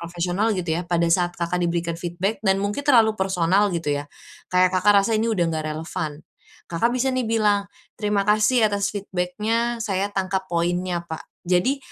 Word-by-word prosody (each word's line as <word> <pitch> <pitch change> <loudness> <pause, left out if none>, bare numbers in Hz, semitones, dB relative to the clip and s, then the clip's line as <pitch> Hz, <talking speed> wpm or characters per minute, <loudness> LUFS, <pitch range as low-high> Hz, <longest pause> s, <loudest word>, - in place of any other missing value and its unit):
profesional 175 +6 -1
gitu 175 -3 -2
ya, 175 - -2
pada 170 -1 +2
saat 175 0 +2
Kakak 175 +1 -1
diberikan 170 -1 -1
feedback 180 +5 -2
dan 190 -1 +3
mungkin 205 +6 -2
terlalu 230 -6 +5
personal 190 +1 +2
gitu 165 -3 -1
ya, 145 0 -4 0.5
kayak 180 0 +4
Kakak 200 +2 +5
rasa 225 - 0
ini 225 +2 0
udah 190 -6 +1
enggak 155 -1 -3
relevan, 155 -1 -5 0.5
Kakak 175 +8 +1
bisa 260 +1 +1
nih 255 -2 -1
bilang, 210 -3 +2 0.3
"Terima 205 -1 +1
kasih 215 +3 +3
atas 205 -1 -1
feedback-nya, 210 +5 -1
saya 195 -2 -1
tangkap 190 -1 -2
poinnya, 175 +1 -1
Pak". 160 -1 -6 0.2
Jadi, 180 +10 +1
185 Hz, 170 wpm, -23 LUFS, 175-210 Hz, 0.5 s, terlalu